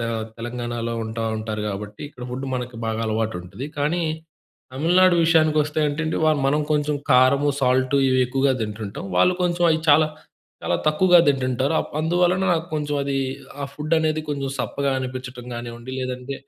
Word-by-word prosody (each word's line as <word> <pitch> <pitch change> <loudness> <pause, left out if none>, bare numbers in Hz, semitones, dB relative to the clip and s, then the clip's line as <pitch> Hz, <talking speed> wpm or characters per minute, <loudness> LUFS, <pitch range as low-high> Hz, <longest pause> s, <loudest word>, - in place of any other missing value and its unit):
'తె 115 - -2 0.3
తెలంగాణాలో' 120 -1 -4
ఉంటా 115 +1 -4
ఉంటారు 110 -1 -4
గాబట్టి 105 +1 -6
ఇక్కడ 125 -4 -10
ఫుడు 135 +1 -4
మనకి 125 -1 -6
బాగా 110 0 -2
అలవాటుంటది. 110 +2 -3
కానీ 155 +5 0 0.7
'తమిళనాడు' 175 +5 +4
విషయానికొస్తే 155 -2 +3
అంటే 145 +2 -3
అండి 160 - -1
వాళ్ళు 155 -2 +3
మనం 150 +2 +2
కొంచెం 150 0 0 0.2
కారము, 130 +3 +5
సాల్టు, 130 +2 +2
ఇవి 130 - +3
ఎక్కువగా 135 +2 +1
తింటుంటాం. 105 -2 -5
వాళ్ళు 180 - +4
కొంచెం 175 0 +1
అయి 160 - 0
చాలా 155 +1 +5 0.6
చాలా - - +1
తక్కువగా 175 +3 +5
తింటుంటారు. 130 0 +1
అప్ - - -7
అందువలన 175 +3 +2
నాకు 165 -1 -1
కొంచెం 150 -1 -2
అది 140 0 -1 0.5
ఆ - - 0
ఫుడ్ 155 +2 -1
అనేది 155 -1 0
కొంచెం 140 -2 -2
సప్పగా 140 +2 -1
అనిపిచ్చటం 130 -1 -6
గానివ్వండి 120 +1 -7
లేదంటే 130 +1 -4
135 Hz, 155 wpm, -23 LUFS, 120-155 Hz, 0.7 s, కారము